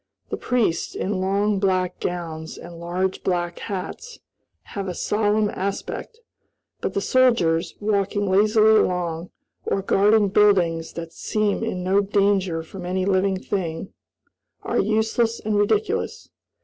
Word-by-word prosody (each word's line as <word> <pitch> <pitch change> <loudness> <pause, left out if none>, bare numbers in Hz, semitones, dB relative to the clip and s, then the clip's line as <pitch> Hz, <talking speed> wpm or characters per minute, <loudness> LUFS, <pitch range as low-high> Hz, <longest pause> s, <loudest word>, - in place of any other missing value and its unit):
The - - 0
priests, 235 -9 0
in 190 -1 -2
long 200 +2 +1
black 185 -2 0
gowns 165 -3 -4
and 170 0 -10
large 180 +2 -2
black 175 -2 -1
hats, 215 - -6 0.6
have 200 -1 -3
a 180 - -4
solemn 210 +1 +1
aspect; 200 - -5 0.6
but - - -3
the 200 - +1
soldiers, 190 -9 +2
walking 205 -1 0
lazily 215 +3 +5
along, 175 -1 -1 0.3
or 195 - -1
guarding 205 +1 +4
buildings 180 -5 +3
that 165 -1 -7
seem 215 +3 -1
in 185 -5 -3
no 195 +2 +3
danger 195 -4 +1
from 180 +3 -9
any 185 +1 -1
living 190 0 +2
thing, 185 -3 -4 0.7
are - - 0
useless 220 +2 +1
and 215 0 -2
ridiculous. 415 - 0
195 Hz, 130 wpm, -23 LUFS, 180-210 Hz, 0.7 s, lazily